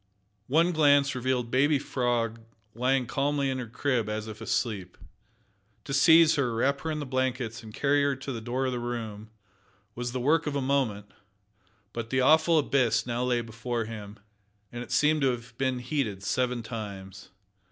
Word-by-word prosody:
One 165 +6 +3
glance 145 -3 +4
revealed 125 -1 -1
baby 145 +3 +3
Frog 120 -4 -1 0.3
lying 125 +2 +1
calmly 140 +2 0
in 130 - -3
her 125 - -5
crib 120 -2 -1
as 110 0 -3
if 110 -1 -9
asleep. 100 -7 -2 0.9
To 135 - -5
seize 160 +2 +6
her, 125 -5 0
wrap 140 +4 +1
her 160 - -3
in 155 - -2
the 150 - -4
blankets, 130 -3 -2
and 110 -2 -11
carry 145 +5 +2
her 140 -1 +1
to 130 +1 -6
the 115 -3 -5
door 125 +3 -2
of 130 - 0
the 125 - -3
room, 110 -3 -5 0.6
was 120 +1 -4
the 130 - -3
work 150 +5 +2
of 145 - -2
a - - +1
moment, 130 -7 -1 0.8
but 115 -1 -5
the 130 - +1
awful 160 +5 +5
abyss 140 -5 +2
now 120 0 -2
lay 125 -1 +1
before 115 0 -4
him, 105 -2 -8 0.5
and 120 - -6
it 120 - -9
seemed 150 0 +3
to 135 - +3
have 120 -1 -5
been 130 -1 0
heated 125 -6 -2
seven 125 +2 -1
times. 100 -4 -8
125 Hz, 180 wpm, -28 LUFS, 115-140 Hz, 0.9 s, seize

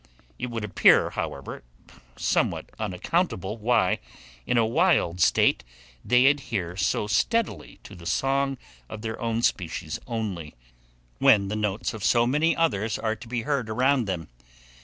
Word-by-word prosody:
It 125 - -3
would 115 -2 -4
appear, 105 - +4
however, 70 -1 -5 0.5
somewhat - - -1
unaccountable 105 - -2
why, 110 -4 +2 0.5
in 125 - +1
a 115 - +4
wild 115 - +2
state, 65 - +3 0.4
they 125 +1 +4
adhere 110 -11 0
so 95 +2 0
steadily 215 - -1
to - - -12
the 85 -2 -10
song 135 +7 0 0.3
of 110 0 -8
their 110 -1 -5
own 115 0 -1
species 80 -6 -1
only, 100 - -4 0.6
when 100 -2 +5
the 105 - -2
notes 105 +2 -2
of 110 -3 -7
so 120 +4 +4
many 150 +7 +2
others 110 -10 0
are 110 -1 -1
to 115 - -13
be 115 -1 -3
heard 130 -4 -1
around 125 +2 +2
them. 90 -5 -4
110 Hz, 145 wpm, -25 LUFS, 95-125 Hz, 0.6 s, when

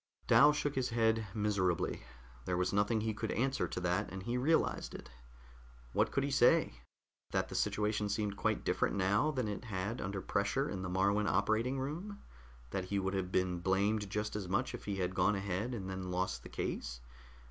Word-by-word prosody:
Dal 150 +1 +7
shook 150 -1 -1
his 130 -2 0
head 115 -2 +2
miserably. 100 -5 0 0.4
There 90 - 0
was 90 +2 0
nothing 105 +2 +2
he 110 0 -1
could 110 +1 -3
answer 135 +3 0
to - - -4
that, 90 -1 0
and 95 +1 -6
he 120 +4 -2
realized 145 +6 +1
it. - - -10 0.8
What - - +2
could - - +1
he - - -1
say? - - +4 0.5
That - - -1
the - - -7
situation 105 0 0
seemed 100 0 -1
quite - - 0
different - - +1
now 100 +9 +2
than 130 -6 -1
it 105 +3 -4
had 105 +2 -3
under 95 +1 -3
pressure 100 +9 0
in 95 -8 -4
the 90 - -3
Moruan 100 +3 +2
operating 110 +7 +1
room? 170 +10 -5 0.5
That 95 -1 -2
he 100 +2 -2
would 95 0 -1
have 95 -2 -2
been 90 -1 +1
blamed 100 +3 +1
just 105 +1 -2
as 100 -3 -3
much 95 - 0
if - - -7
he 100 - -2
had 95 -1 -1
gone 95 +3 +3
ahead, 100 +5 -2
and 95 -4 -5
then 95 -1 -4
lost 90 -9 -1
the - - -11
case? 60 0 -4
100 Hz, 195 wpm, -34 LUFS, 95-115 Hz, 0.8 s, Dal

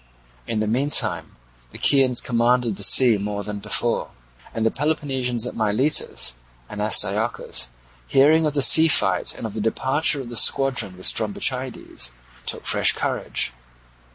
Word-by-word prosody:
In 110 -2 -2
the - - -1
meantime 130 +7 0 0.3
the - - -11
Chians 130 -3 +3
commanded 120 -1 0
the 100 - -7
sea 120 -1 +5
more 100 0 -4
than 105 0 -6
before; 105 +3 -2 0.4
and 115 - -3
the 115 - +2
Peloponnesians 130 -5 -2
at - - -7
Miletus 110 - +1 0.3
and 105 +6 -7
Astyochus, 105 - +1 0.4
hearing 155 - +3
of 150 - -3
the 140 - +2
sea 160 +4 +6
fight 155 - +2
and - - -8
of 110 - -6
the 110 - -4
departure 135 +7 0
of 130 -3 -8
the 120 - -8
squadron 120 -7 +1
with 95 - -7
Strombichides, - - -2 0.3
took - - -5
fresh - - +2
courage. - - -3
120 Hz, 150 wpm, -21 LUFS, 105-135 Hz, 0.4 s, sea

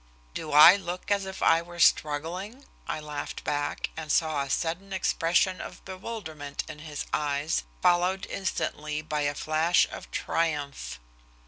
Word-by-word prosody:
"Do 155 - -5
I 155 +6 +10
look 180 0 -6
as 200 -1 +1
if 190 - -5
I 165 - +5
were 175 +1 -11
struggling?" 175 - +1 0.2
I - - -2
laughed 150 -1 -6
back, 145 0 -2
and 155 -1 -4
saw 155 -3 +2
a 140 - -4
sudden 175 +7 -2
expression 185 0 +1
of - - -9
bewilderment 185 -7 -6
in 150 - -8
his 155 -2 -6
eyes, 145 - 0 0.2
followed 180 +2 +3
instantly 155 -5 -3
by 150 -1 -2
a 145 0 0
flash 160 +4 +3
of - - -8
triumph. 140 - -2
160 Hz, 145 wpm, -28 LUFS, 150-185 Hz, 0.2 s, I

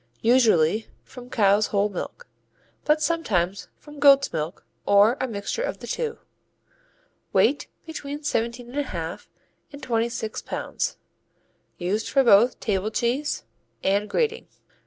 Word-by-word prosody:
Usually 220 -5 +4 0.2
from 250 -1 -12
cow's 205 -2 +3
whole 200 0 +1
milk, 210 - -7 0.6
but 305 +1 +3
sometimes 200 - 0
from 295 -1 -13
goat's 275 -1 +6
milk 160 +2 -4 0.2
or 205 +4 +5
a 260 - 0
mixture 210 - -4
of - - -2
the - - -10
two. 465 -1 -3 1.2
Weight - - +3 0.2
between 295 -2 -6
17 235 -3 -2
1/2 180 - -4 0.4
and 285 -1 -11
26 230 -2 -2
pounds. - - -3 0.8
Used 195 +5 -2
for 275 - +4
both 235 +1 +5
table 205 -1 -1
cheese 245 +7 -1 0.4
and 200 +2 +1
grating. 460 0 -1
235 Hz, 120 wpm, -24 LUFS, 200-285 Hz, 1.2 s, goat's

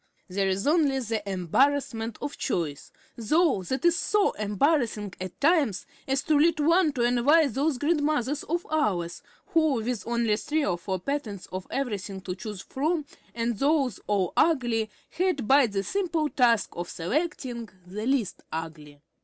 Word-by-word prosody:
There 195 +1 0
is 190 +1 -1
only 295 -3 +3
the 225 -3 -2
embarrassment 225 - +1
of 290 0 -4
choice, 160 - -3 0.2
though 275 - +2
that 260 - -3
is 345 -1 +5
so 410 +3 +2
embarrassing 210 - 0
at 185 -1 -6
times 290 - +2 0.2
as 270 +1 0
to 300 -1 +3
lead 320 0 +3
one 335 +2 +4
to 245 -3 0
envy 250 +7 +4
those 275 +3 0
grandmothers 295 -2 0
of 340 +3 -2
ours, 175 - 0 0.3
who, 315 -3 +4
with 230 -3 -2
only 235 -3 +1
three 300 +5 -1
or 175 -2 -1
four 190 +1 -3
patterns 225 -5 -4
of 185 0 -5
everything 205 -7 -3
to 185 -1 -4
choose 200 +1 -7
from, 305 +3 -1 0.3
and 230 -2 -1
those 275 -6 +2
all 195 -4 +1
ugly, 240 -9 +2 0.2
had 345 - 0
but 270 -3 +5
the 195 -1 0
simple 335 - -1
task 235 -6 +3
of 175 0 -5
selecting 245 - -3 0.2
the 210 +5 -5
least 265 -7 0
ugly! 155 -3 -7
245 Hz, 155 wpm, -27 LUFS, 200-300 Hz, 0.3 s, is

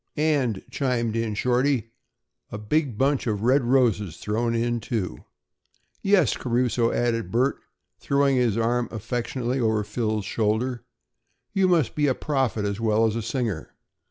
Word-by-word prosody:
"And," 140 -9 +1
chimed 120 -5 -1
in 115 -2 -1
Shorty, 125 0 +1 0.6
"a - - -4
big 120 +3 -1
bunch 135 0 +1
of 105 -2 -1
red 130 +3 +4
roses 115 -9 +2
thrown 115 +2 -1
in, 120 +1 0
too." 105 - -4 0.8
"Yes, 195 - +3
Caruso," 120 -1 +1
added 115 -5 0
Bert, 125 +6 +1 0.4
throwing 140 -1 +2
his 120 -4 +2
arm 120 +1 +1
affectionately 120 +3 -3
over 110 -3 +1
Phil's 110 -1 -2
shoulder, 115 +4 -1 0.7
"you 195 -1 +3
must 165 -8 +2
be 150 -1 +1
a 130 - +2
prophet 130 -7 -1
as 100 +1 -2
well 110 0 +2
as 110 -1 0
a 115 - -1
singer." 115 - -3
120 Hz, 145 wpm, -25 LUFS, 110-130 Hz, 0.8 s, red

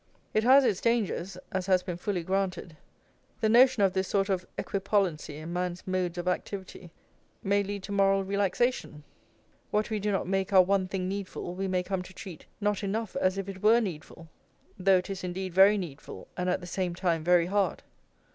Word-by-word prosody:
It 215 - +2
has 265 +3 +6
its 200 -5 +1
dangers, 205 -5 0
as 190 -1 -2
has 185 -2 +3
been 180 -2 -4
fully 180 0 -3
granted; 185 -2 -2 0.6
the 220 - +1
notion 245 -1 +6
of 190 -2 +3
this 190 0 0
sort 200 0 0
of 185 -2 -1
equipollency 195 -6 -1
in 160 +3 -7
man's 180 0 -3
modes 185 -2 -1
of 175 0 -4
activity 185 -1 -4 0.5
may 200 +1 +2
lead 200 -1 -5
to 200 - -7
moral 195 -1 +3
relaxation, 200 - -1 0.7
what 215 +2 0
we 215 - 0
do 210 +1 -1
not 195 - -1
make 195 +1 -1
our 185 -1 +8
one 190 0 +1
thing 185 -1 -3
needful 190 -2 -5
we 190 +1 -3
may 185 -1 0
come 190 0 -2
to 185 0 -12
treat 175 -5 -10
not 210 -1 0
enough 210 +1 -3
as 185 +1 +1
if 195 -1 -3
it 190 -1 -7
were 225 +3 +5
needful, 165 -5 -6 0.5
though 190 0 +4
it 180 - -4
is 195 -1 -5
indeed 185 0 -4
very 195 +3 +6
needful 165 -8 -7
and 180 0 -1
at 180 - 0
the - - -8
same 180 0 -2
time 170 -3 0
very 175 0 +4
hard. 200 +2 0
190 Hz, 195 wpm, -28 LUFS, 180-200 Hz, 0.7 s, our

